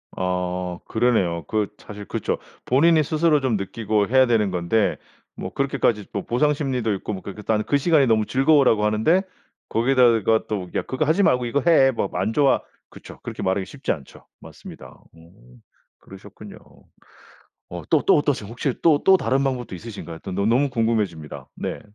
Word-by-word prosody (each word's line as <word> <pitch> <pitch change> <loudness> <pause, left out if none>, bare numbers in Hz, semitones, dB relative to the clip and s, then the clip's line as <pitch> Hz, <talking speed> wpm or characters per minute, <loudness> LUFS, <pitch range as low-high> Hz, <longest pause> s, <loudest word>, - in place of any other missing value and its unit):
아 90 -1 -3
그러네요. 100 -9 +1
그 105 -2 0
사실 105 -1 -10
그쵸. - - -3 0.3
본인이 155 +4 +4
스스로 155 0 +2
좀 125 -5 0
느끼고 105 +1 -1
해야 130 +1 +4
되는 110 -5 +1
건데 90 +4 0 0.4
뭐 - - -7
그렇게까지 120 -6 0
뭐 - - -3
보상심리도 130 -4 0
있고 100 - -5
뭐 95 - -6
그렇게 100 +1 -9
"난 110 -1 0
그 145 - +1
시간이 145 -2 +3
너무 110 -2 +2
즐거워."라고 135 -5 +3
하는데 110 - +2 0.5
거기에다가 115 -3 +3
또 95 -4 -4
"야 - - +1
그거 130 +4 -2
하지 165 +7 +2
말고 125 -6 +2
이거 135 +4 0
해. 135 -5 +5
막 110 -5 -2
안 105 +4 -1
좋아." 140 +1 +3 0.3
그쵸. - - -13
그렇게 - - -7
말하기 95 +1 0
쉽지 145 +6 -4
않죠. 70 -6 -8
맞습니다. - - -13 0.2
오. 80 -7 -19 0.4
그러셨군요. - - -13 1.1
어 - - -7
또 - - +4
또 - - +5
어떠세요? 140 -8 -1
혹시 125 +2 -2
또 155 -3 +3
또 190 0 +6
다른 135 -1 0
방법도 125 -7 -3
있으신가요? 90 -5 -9
또 95 - -6
너 100 +2 -1
너무 130 +5 +2
궁금해집니다. 100 - -2
네. - - -5
115 Hz, 365 characters per minute, -22 LUFS, 100-135 Hz, 1.1 s, 또